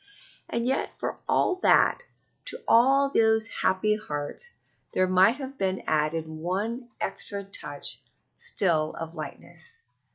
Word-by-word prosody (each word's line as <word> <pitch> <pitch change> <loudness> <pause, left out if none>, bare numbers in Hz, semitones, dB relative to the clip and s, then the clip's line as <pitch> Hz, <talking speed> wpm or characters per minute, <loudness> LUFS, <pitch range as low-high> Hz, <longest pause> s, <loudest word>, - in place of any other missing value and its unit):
And 235 0 -1
yet 265 +2 -1
for - - -4
all 370 - +2
that, 430 - +4 0.4
to 475 - -7
all 275 +4 +5
those 220 -3 +4 0.2
happy 190 +3 +2
hearts 215 - -6 0.5
there 185 - +4
might 185 +6 +4
have 275 -1 -8
been 190 -1 -1
added 155 +1 0
one 195 +10 -3
extra 200 -1 -4
touch 145 - -2 0.4
still 160 -5 0
of 165 0 -6
lightness. 460 - -10
200 Hz, 125 wpm, -27 LUFS, 165-245 Hz, 0.5 s, all